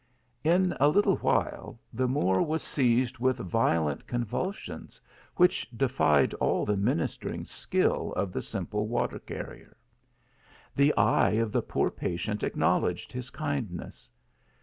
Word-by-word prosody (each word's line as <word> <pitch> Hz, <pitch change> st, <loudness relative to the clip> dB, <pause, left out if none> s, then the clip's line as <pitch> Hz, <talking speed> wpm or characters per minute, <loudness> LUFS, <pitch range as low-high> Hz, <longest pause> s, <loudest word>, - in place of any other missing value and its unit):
In 180 Hz, +3 st, +3 dB
a 145 Hz, -, +5 dB
little 205 Hz, +7 st, +3 dB
while -, -, -1 dB
the 130 Hz, +2 st, 0 dB
Moor 95 Hz, -8 st, +2 dB
was 160 Hz, 0 st, -1 dB
seized 125 Hz, -1 st, +1 dB
with 130 Hz, +1 st, +2 dB
violent 85 Hz, -, 0 dB
convulsions, 120 Hz, -, -4 dB, 0.4 s
which 180 Hz, 0 st, +3 dB
defied 120 Hz, -, +2 dB
all -, -, 0 dB
the 105 Hz, -, +1 dB
ministering 95 Hz, -4 st, -1 dB
skill -, -, 0 dB
of 95 Hz, -1 st, -2 dB
the -, -, -2 dB
simple 105 Hz, +1 st, -3 dB
water 120 Hz, +2 st, -1 dB
carrier. -, -, -9 dB, 1.0 s
The 140 Hz, +2 st, +5 dB
eye -, -, +4 dB
of 110 Hz, 0 st, +1 dB
the -, -, +1 dB
poor -, -, 0 dB
pa 85 Hz, -, -3 dB
tient 105 Hz, +4 st, -3 dB
acknowledged 90 Hz, +5 st, 0 dB
his 125 Hz, 0 st, -5 dB
kindness. 135 Hz, -, -5 dB
120 Hz, 130 wpm, -28 LUFS, 100-140 Hz, 1.0 s, a